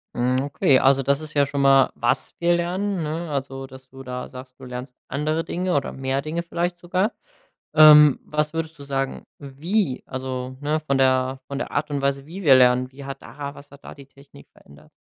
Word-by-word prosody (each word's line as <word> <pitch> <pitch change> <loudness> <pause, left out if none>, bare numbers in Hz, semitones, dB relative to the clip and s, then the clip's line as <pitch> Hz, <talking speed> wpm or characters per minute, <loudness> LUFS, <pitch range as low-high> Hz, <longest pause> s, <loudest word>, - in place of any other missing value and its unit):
Mhm, 125 +2 +1
okay, 140 -1 +3
also 135 0 +3
das 140 +2 +1
ist 155 -1 -10
ja 145 -1 +3
schon 140 +1 -4
mal 135 -1 +5
was 120 - -1
wir 175 0 +3
lernen, 180 +2 -2
ne? 160 +2 -4
Also 135 -1 -4
dass 130 0 -15
du 135 +1 -12
da 125 -1 -6
sagst, 130 0 -12
du 135 - -15
lernst 125 0 -8
andere 155 +4 -1
Dinge 180 0 -2
oder 140 - -1
mehr 135 +1 -2
Dinge 155 +4 -3
vielleicht 175 +1 -3
sogar. 180 +5 -1 0.6
Ähm, 150 -2 +8
was 150 +1 -2
würdest 165 0 -4
du - - -10
sagen, 135 -1 -3
wie, 145 +2 -2
also, 130 0 -5
ne, 150 +2 -1
von 140 -3 -1
der 130 0 +2
von 140 - -4
der - - -4
Art 150 - -2
und 145 -1 -2
Weise, 140 0 -1
wie 180 +5 -8
wir 145 -6 +7
lernen, 125 0 +4
wie 140 +1 -11
hat 135 0 -7
da 140 -1 -8
was 140 +1 -15
hat 140 0 -17
da - - -9
die 140 -1 -14
Technik 140 - -18
verändert? 70 +1 -19
140 Hz, 210 wpm, -23 LUFS, 130-155 Hz, 0.6 s, Ähm